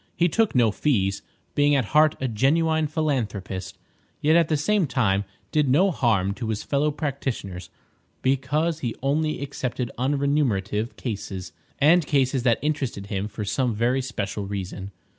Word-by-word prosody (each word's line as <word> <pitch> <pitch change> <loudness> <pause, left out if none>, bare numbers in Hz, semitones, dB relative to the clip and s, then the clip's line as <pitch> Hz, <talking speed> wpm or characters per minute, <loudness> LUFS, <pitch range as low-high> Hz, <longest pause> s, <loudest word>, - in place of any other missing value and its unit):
He 175 - +3
took 220 +2 +1
no 120 -3 +4
fees, 100 -7 0 0.3
being 145 0 +3
at 135 -4 +2
heart 155 0 +5
a 130 - -1
genuine 155 +7 +2
philanthropist, 110 - -2 0.4
yet 155 +2 +3
at 170 -2 +4
the 155 - +1
same 195 +3 +1
time 100 -6 +1 0.3
did 150 -3 +2
no 185 +9 +4
harm 105 - +1
to 115 +1 -5
his 110 -1 -2
fellow 145 +1 +1
practitioners, 135 - -4 0.5
because 145 +5 +1
he 120 -6 -3
only 155 +2 0
accepted 125 -3 -3
unremunerative 130 -6 0
cases, 95 - -5 0.2
and 165 +5 +5
cases 135 -2 +2
that 120 -2 +3
interested 135 -9 -2
him 100 +1 -1
for 105 0 -5
some 120 +2 0
very 120 +4 +1
special 105 -5 -4
reason. 95 -1 -5
130 Hz, 150 wpm, -24 LUFS, 105-150 Hz, 0.5 s, heart